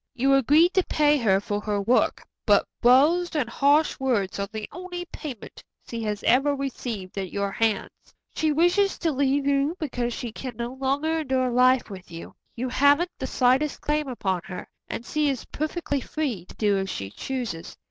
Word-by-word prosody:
You 270 +2 +3
agreed 295 +7 +5
to 375 - +3
pay 300 -1 +3
her 200 -7 +3
for 205 +1 -3
her 210 -1 -1
work, 230 +6 +1 0.2
but - - +5 0.2
blows 305 +9 +4
and 290 -6 +1
harsh 285 +6 +2
words 230 -8 0
are 200 - -1
the 215 -1 -5
only 355 -1 -6
payment 265 -9 -8 0.2
she 230 -1 -5
has 210 -2 -3
ever 285 +3 +3
received 235 -8 -5
at 190 -2 -4
your 200 0 -2
hands. 220 -1 0 0.4
She 315 -1 +1
wishes 350 +6 +2
to 330 - 0
leave 275 0 +1
you 280 +3 +1
because 245 -6 -2
she 235 0 -5
can 250 +1 -7
no 240 +1 -4
longer 280 +5 0
endure 260 -4 0
life 250 -1 +3
with 190 -1 -10
you. 165 0 -9 0.2
You 250 +2 -3
haven't 285 +7 +3
the - - -3
slightest 260 +4 +2
claim 300 0 0
upon 190 -8 -2
her, 180 - -7 0.2
and 235 - -5
she 300 -1 0
is 265 -4 -3
perfectly 305 -2 -3
free 250 - -3
to - - -14
do 205 -2 +1
as 190 0 -3
she 95 - -5
chooses. 240 - -5
260 Hz, 185 wpm, -25 LUFS, 220-295 Hz, 0.4 s, agreed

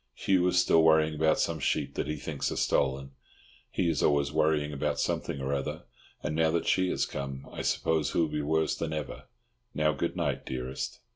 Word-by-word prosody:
Hugh 90 -2 +2
is 90 0 +3
still 85 -2 +5
worrying 80 -1 +4
about 80 +1 +2
some - - 0
sheep - - -1
that - - -2
he 75 - -2
thinks 70 -2 -3
are - - -3
stolen. 70 +1 0 0.6
He 90 - 0
is 80 -4 +1
always 70 -1 +2
worrying 75 -1 +1
about 70 - -1
something 70 - -1
or 70 +1 -2
other, 70 -1 -3 0.4
and 75 - -2
now 80 0 +3
that 85 +1 0
she 95 -1 +2
has - - 0
come 70 -1 -6
I - - -4
suppose 80 -3 0
he - - +1
will 80 - +3
be 75 0 -2
worse 80 +2 +1
than 80 -1 -3
ever. 75 -2 -5 0.5
Now 75 +1 +3
goodnight, 70 - -2
dearest... 65 0 -5
75 Hz, 200 wpm, -29 LUFS, 70-80 Hz, 0.6 s, still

